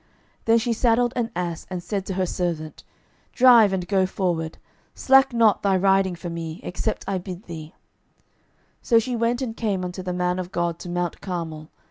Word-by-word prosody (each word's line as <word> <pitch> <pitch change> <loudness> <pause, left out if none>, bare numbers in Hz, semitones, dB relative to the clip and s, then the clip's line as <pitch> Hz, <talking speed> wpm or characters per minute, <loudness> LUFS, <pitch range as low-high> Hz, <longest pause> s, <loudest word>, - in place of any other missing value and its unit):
12:004:024 - - -37 0.4
Then 225 0 +5
she 235 +1 0
saddled 240 +1 +2
an 235 -2 -1
ass, 175 -2 -4
and 180 -2 -5
said 200 -1 -3
to 190 - -3
her 185 0 +1
servant, 170 -3 -3 0.5
Drive, 240 -5 +7
and 185 -2 -2
go 190 -2 +2
forward; 170 -4 -2 0.4
slack 270 0 +5
not 230 -4 +3
thy 195 -2 +2
riding 190 -1 +2
for 175 0 -7
me, 165 0 -5
except 180 - -3
I 195 -1 -1
bid 180 +1 -8
thee. 160 -2 -9 1.1
12:004:025 - - -20
So 230 - +5
she 240 +2 +1
went 235 +2 0
and 225 -3 -4
came 200 -6 -1
unto 180 +1 -5
the 180 0 -4
man 180 0 -1
of 180 0 -5
God 170 -2 -1
to 175 - -8
mount 175 -1 -3
Carmel. 165 -4 -5
185 Hz, 195 wpm, -24 LUFS, 175-225 Hz, 1.1 s, Drive